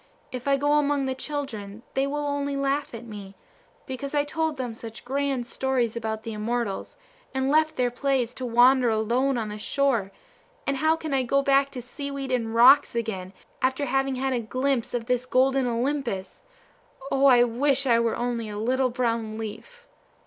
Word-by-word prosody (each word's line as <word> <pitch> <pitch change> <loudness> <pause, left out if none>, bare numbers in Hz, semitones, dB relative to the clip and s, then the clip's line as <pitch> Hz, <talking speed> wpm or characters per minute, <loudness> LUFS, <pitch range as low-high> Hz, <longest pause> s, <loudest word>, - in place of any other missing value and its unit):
If 255 +1 -6
I 275 0 +4
go 290 +2 +3
among 285 -1 +1
the 265 - -1
children 235 -7 -5
they 270 +1 +1
will 295 +1 -2
only 285 0 -1
laugh 275 -1 -1
at 230 +1 -8
me, 200 -3 -9 0.5
because 275 +2 -5
I 290 - +3
told 315 0 -2
them 250 -3 -3
such 225 0 -10
grand 270 -1 -1
stories 255 -3 -1
about 220 -1 -3
the 225 - -5
immortals, 215 -1 -3 0.4
and 265 +1 +1
left 310 +1 +3
their 245 -1 +1
plays 250 -2 0
to 260 - -7
wander 245 +1 +5
alone 240 +5 +1
on 220 -2 -2
the 210 0 -6
shore; 235 -5 0 0.5
and 275 -1 0
how 315 +3 +3
can 315 -3 -5
I 270 - +3
go 275 +3 +1
back 275 0 +3
to 250 -3 -6
seaweed 275 +1 -5
and 230 -3 -1
rocks 250 +3 +7
again, 200 -6 -3 0.3
after 265 +2 +1
having 270 0 0
had 265 +1 -1
a 245 - 0
glimpse 255 +2 -1
of 235 -1 -2
this 250 0 0
golden 265 0 +3
Olympus? 240 -5 -2 0.7
O, 275 +1 +4
I 245 -2 +7
wish 270 +3 +1
I 235 -3 +4
were 230 -1 +1
only 235 -2 -2
a 205 - -6
little 255 +4 +1
brown 230 -3 -1
leaf!" 475 - -8
255 Hz, 185 wpm, -26 LUFS, 230-275 Hz, 0.7 s, rocks